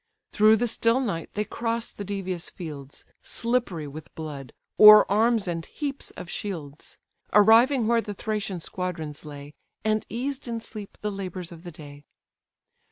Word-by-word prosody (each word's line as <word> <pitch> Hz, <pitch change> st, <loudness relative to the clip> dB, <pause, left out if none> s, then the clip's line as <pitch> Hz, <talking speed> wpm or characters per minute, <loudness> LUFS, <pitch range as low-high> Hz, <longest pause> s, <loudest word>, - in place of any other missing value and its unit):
Through 215 Hz, +1 st, +6 dB
the 240 Hz, +2 st, 0 dB
still 230 Hz, +2 st, +2 dB
night 200 Hz, -11 st, -3 dB
they 210 Hz, -, 0 dB
cross 230 Hz, +2 st, -2 dB
the 205 Hz, -, -7 dB
devious 190 Hz, -3 st, -4 dB
fields, 145 Hz, -5 st, -9 dB, 0.2 s
Slippery 230 Hz, -10 st, -1 dB
with 150 Hz, +2 st, -11 dB
blood, 145 Hz, -5 st, -7 dB, 0.3 s
o'er 210 Hz, 0 st, +11 dB
arms 220 Hz, 0 st, +3 dB
and 165 Hz, -1 st, -2 dB
heaps 285 Hz, -2 st, -5 dB
of -, -, -7 dB
shields, 160 Hz, -7 st, -6 dB, 0.4 s
Arriving 225 Hz, +5 st, +6 dB
where 230 Hz, +1 st, +3 dB
the 205 Hz, -2 st, -6 dB
Thracian 210 Hz, -3 st, -3 dB
squadrons 160 Hz, -5 st, -5 dB
lay, 145 Hz, -1 st, -9 dB, 0.3 s
And 215 Hz, 0 st, +1 dB
eased 265 Hz, +3 st, -4 dB
in 230 Hz, -1 st, -3 dB
sleep 215 Hz, -2 st, -10 dB
the 210 Hz, -, -2 dB
labours 185 Hz, -3 st, -6 dB
of 165 Hz, -1 st, -11 dB
the 175 Hz, 0 st, -9 dB
day. 145 Hz, -2 st, -12 dB
200 Hz, 155 wpm, -26 LUFS, 165-230 Hz, 0.4 s, o'er